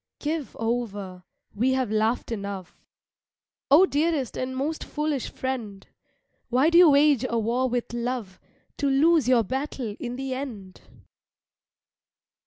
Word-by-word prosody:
Give 305 Hz, -1 st, -4 dB
over, 205 Hz, -6 st, -3 dB, 0.3 s
we 250 Hz, +5 st, +1 dB
have 260 Hz, -4 st, -1 dB
laughed 220 Hz, +3 st, 0 dB
enough; 200 Hz, -4 st, -6 dB, 0.8 s
Oh 305 Hz, +7 st, +7 dB
dearest 300 Hz, -5 st, 0 dB
and 260 Hz, 0 st, -3 dB
most 305 Hz, +4 st, -2 dB
foolish 300 Hz, -3 st, -2 dB
friend, 230 Hz, -7 st, -5 dB, 0.6 s
Why 265 Hz, +6 st, +3 dB
do 340 Hz, -, +7 dB
you 355 Hz, -3 st, +8 dB
wage 285 Hz, -3 st, +4 dB
a 235 Hz, -, 0 dB
war 240 Hz, +4 st, 0 dB
with 240 Hz, -1 st, -3 dB
love 240 Hz, -5 st, -4 dB, 0.4 s
To 285 Hz, -, 0 dB
lose 300 Hz, 0 st, +4 dB
your 245 Hz, -3 st, +5 dB
battle 260 Hz, -2 st, -4 dB
in 245 Hz, 0 st, -5 dB
the 265 Hz, 0 st, -4 dB
end? 225 Hz, -9 st, -7 dB
255 Hz, 130 wpm, -25 LUFS, 225-285 Hz, 0.8 s, you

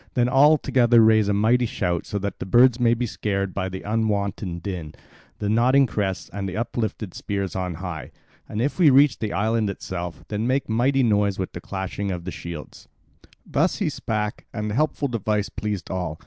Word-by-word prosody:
Then 120 Hz, -1 st, +3 dB
all 145 Hz, +4 st, +6 dB
together 120 Hz, -4 st, +3 dB
raise 110 Hz, -2 st, +5 dB
a 100 Hz, -, +2 dB
mighty 115 Hz, +4 st, +3 dB
shout 85 Hz, -5 st, -2 dB
so 105 Hz, -, -3 dB
that 100 Hz, 0 st, -4 dB
the -, -, -4 dB
birds 120 Hz, +4 st, +5 dB
may 120 Hz, -1 st, +4 dB
be 125 Hz, +1 st, -1 dB
scared 100 Hz, -4 st, -2 dB
by 95 Hz, -1 st, -2 dB
the 95 Hz, 0 st, -7 dB
unwonted 100 Hz, -5 st, -1 dB
din, 85 Hz, -6 st, -5 dB, 0.4 s
the 105 Hz, -, -3 dB
nodding 125 Hz, +6 st, +4 dB
crests, 100 Hz, -5 st, -2 dB
and 100 Hz, -1 st, -3 dB
the 95 Hz, -, -5 dB
uplifted 110 Hz, -4 st, -3 dB
spears 100 Hz, -2 st, -3 dB
on 90 Hz, -2 st, -2 dB
high. 90 Hz, -2 st, -6 dB, 0.4 s
And 110 Hz, +3 st, -2 dB
if 145 Hz, +6 st, -2 dB
we 165 Hz, -5 st, +7 dB
reach 140 Hz, +1 st, +5 dB
the 110 Hz, -2 st, -2 dB
island 110 Hz, 0 st, +1 dB
itself, 90 Hz, -3 st, -6 dB
then 110 Hz, +2 st, -1 dB
make 135 Hz, +2 st, 0 dB
mighty 130 Hz, +4 st, +2 dB
noise 105 Hz, -4 st, +2 dB
with 95 Hz, -, -3 dB
the 85 Hz, -, -7 dB
clashing 95 Hz, +1 st, -4 dB
of 90 Hz, -1 st, -5 dB
shields." 85 Hz, -3 st, -8 dB, 0.6 s
Thus 165 Hz, +6 st, +1 dB
he 200 Hz, -7 st, 0 dB
spake, 110 Hz, -6 st, -3 dB
and 105 Hz, -1 st, -3 dB
the -, -, -3 dB
helpful 150 Hz, +2 st, 0 dB
device 105 Hz, -4 st, -1 dB
pleased 105 Hz, -5 st, -4 dB
all. 90 Hz, -4 st, -3 dB
105 Hz, 190 wpm, -24 LUFS, 95-120 Hz, 0.6 s, we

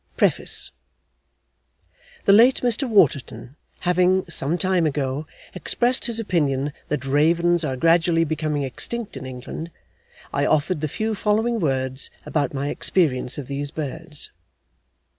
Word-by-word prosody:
D.L. -, -, -39 dB
PREFACE -, -, +3 dB, 1.5 s
The 200 Hz, -, +6 dB
late 240 Hz, +5 st, +6 dB
Mr 245 Hz, +2 st, +1 dB
Waterton 140 Hz, -, +1 dB, 0.3 s
having, 180 Hz, +1 st, +2 dB
some 165 Hz, 0 st, -1 dB
time 185 Hz, -3 st, +1 dB
ago, 145 Hz, +1 st, -2 dB, 0.3 s
expressed 240 Hz, +7 st, +1 dB
his 230 Hz, -1 st, 0 dB
opinion 145 Hz, -9 st, 0 dB
that 145 Hz, -2 st, -3 dB
ravens 170 Hz, +5 st, +2 dB
are 135 Hz, -4 st, -2 dB
gradually 165 Hz, +2 st, +3 dB
becoming 155 Hz, -2 st, -2 dB
extinct 220 Hz, -, -3 dB
in 130 Hz, -, -7 dB
England, 130 Hz, +6 st, -7 dB, 0.6 s
I -, -, +1 dB
offered 155 Hz, +1 st, +1 dB
the 155 Hz, -, 0 dB
few 220 Hz, +9 st, -2 dB
following 220 Hz, +3 st, 0 dB
words 130 Hz, -4 st, -1 dB, 0.2 s
about 145 Hz, -4 st, -1 dB
my 140 Hz, +1 st, -3 dB
experience 130 Hz, -10 st, +1 dB
of 145 Hz, -, -5 dB
these 140 Hz, +2 st, -4 dB
birds. 155 Hz, +1 st, -5 dB
160 Hz, 130 wpm, -22 LUFS, 140-185 Hz, 1.5 s, The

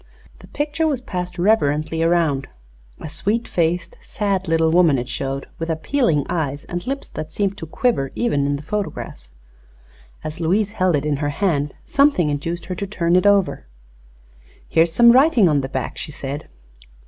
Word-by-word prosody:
The -, -, -14 dB
picture 295 Hz, +2 st, -1 dB
was 285 Hz, -5 st, 0 dB
passed 180 Hz, -7 st, -5 dB
reverently 160 Hz, -5 st, +1 dB
around. 165 Hz, -5 st, +1 dB, 0.5 s
A -, -, -7 dB
sweet 210 Hz, +9 st, -1 dB
faced, 170 Hz, 0 st, -1 dB
sad 195 Hz, -3 st, -2 dB
little 160 Hz, 0 st, +2 dB
woman 165 Hz, -5 st, +4 dB
it 120 Hz, 0 st, -3 dB
showed, 135 Hz, +1 st, -3 dB
with 165 Hz, 0 st, -3 dB
appealing 160 Hz, -, +1 dB
eyes 145 Hz, -4 st, -2 dB
and 175 Hz, +6 st, -5 dB
lips 275 Hz, +1 st, -3 dB
that 155 Hz, 0 st, -6 dB
seemed 200 Hz, +1 st, -1 dB
to 160 Hz, -, -7 dB
quiver 155 Hz, -, 0 dB
even 145 Hz, -13 st, +1 dB
in 145 Hz, -, 0 dB
the 140 Hz, -, -7 dB
photograph. 185 Hz, -, -5 dB, 0.9 s
As 155 Hz, +2 st, -6 dB
Louise 195 Hz, +5 st, +1 dB
held 185 Hz, -5 st, +1 dB
it 145 Hz, 0 st, -1 dB
in 150 Hz, -2 st, 0 dB
her 145 Hz, 0 st, -1 dB
hand 145 Hz, -3 st, -1 dB
something 275 Hz, -, +3 dB
induced 165 Hz, +4 st, -3 dB
her 185 Hz, -, -4 dB
to 200 Hz, +3 st, -4 dB
turn 175 Hz, -3 st, +1 dB
it 185 Hz, +3 st, +4 dB
over. 195 Hz, -, +2 dB, 1.0 s
"Here 165 Hz, -, +3 dB
is 165 Hz, 0 st, +3 dB
some 235 Hz, +7 st, +7 dB
writing 260 Hz, -3 st, +5 dB
upon 150 Hz, -3 st, +2 dB
the 135 Hz, -, -5 dB
back," 130 Hz, -2 st, -4 dB
she -, -, -6 dB
said. 140 Hz, +1 st, -6 dB
170 Hz, 175 wpm, -21 LUFS, 150-205 Hz, 1.0 s, some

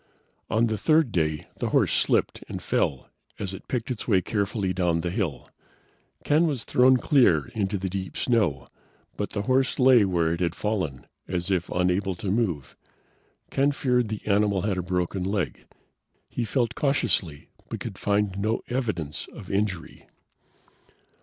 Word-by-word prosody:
On 115 Hz, +1 st, +3 dB
the 110 Hz, -2 st, -1 dB
third 155 Hz, 0 st, +3 dB
day, 75 Hz, -4 st, 0 dB
the -, -, -1 dB
horse -, -, +3 dB
slipped -, -, +1 dB
and -, -, -4 dB
fell 65 Hz, -, -1 dB, 0.3 s
as 100 Hz, -2 st, -4 dB
it 95 Hz, -, -10 dB
picked 125 Hz, 0 st, -2 dB
its 120 Hz, -, -5 dB
way 100 Hz, -5 st, +4 dB
carefully 100 Hz, -1 st, -1 dB
down 85 Hz, -2 st, +1 dB
the 85 Hz, +1 st, -2 dB
hill. 90 Hz, -, -2 dB, 0.8 s
Ken 155 Hz, +3 st, +3 dB
was 140 Hz, -7 st, -2 dB
thrown 130 Hz, +1 st, +5 dB
clear, 120 Hz, -, +3 dB
into 100 Hz, -1 st, -1 dB
the 95 Hz, 0 st, -3 dB
deep 95 Hz, 0 st, -5 dB
snow, 105 Hz, -, +1 dB, 0.5 s
but 105 Hz, -, -3 dB
the 100 Hz, -, -2 dB
horse 130 Hz, +3 st, +2 dB
lay 125 Hz, -3 st, +6 dB
where 85 Hz, -4 st, +1 dB
it 85 Hz, -, -3 dB
had 90 Hz, -2 st, 0 dB
fallen, 90 Hz, -, -2 dB, 0.2 s
as 90 Hz, +1 st, -2 dB
if 90 Hz, -2 st, 0 dB
unable 90 Hz, +1 st, +1 dB
to 95 Hz, +2 st, -3 dB
move. 85 Hz, -, -1 dB, 0.8 s
Ken 140 Hz, +1 st, +3 dB
feared 125 Hz, -5 st, +1 dB
the 110 Hz, -1 st, -5 dB
animal 100 Hz, -2 st, +2 dB
had 95 Hz, -3 st, -1 dB
broken 90 Hz, 0 st, -1 dB
a -, -, -1 dB
leg. 100 Hz, -3 st, -2 dB, 0.6 s
He 120 Hz, -, -3 dB
felt 120 Hz, +1 st, 0 dB
cautiously 100 Hz, -, 0 dB, 0.2 s
but -, -, -4 dB
could -, -, -7 dB
find 100 Hz, -1 st, 0 dB
no 110 Hz, +3 st, 0 dB
evidence 110 Hz, -, -2 dB
of 95 Hz, -, -9 dB
injury. 100 Hz, -4 st, -2 dB
100 Hz, 160 wpm, -26 LUFS, 90-115 Hz, 0.8 s, lay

